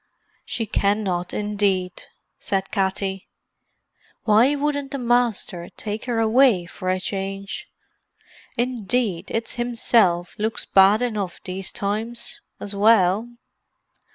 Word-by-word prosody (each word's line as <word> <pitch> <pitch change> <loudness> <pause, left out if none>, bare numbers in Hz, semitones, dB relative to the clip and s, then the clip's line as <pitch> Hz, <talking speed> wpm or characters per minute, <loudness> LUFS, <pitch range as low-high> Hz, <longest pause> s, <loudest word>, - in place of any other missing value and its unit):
"She 230 - -3
cannot, 200 -4 0
indeed," 200 -3 -1 0.3
said 195 -1 -2
Katty. 190 0 -1 1.0
"Why 235 +6 +4
wouldn't 285 -1 -1
the 280 - -4
Masther 235 -8 0
take 215 +1 -4
her 240 -2 -1
away 225 -4 +4
for 185 +1 -5
a 185 0 +1
change? 195 - -4 0.9
Indeed, 235 -5 -1
it's 230 +2 -2
himself 225 -7 +2
looks 220 +1 -1
bad 200 +4 +5
enough 205 -7 -3
these 185 0 -4
times, 220 +4 -3 0.2
as 205 0 -6
well. 205 0 +4
210 Hz, 105 wpm, -23 LUFS, 190-235 Hz, 1.0 s, bad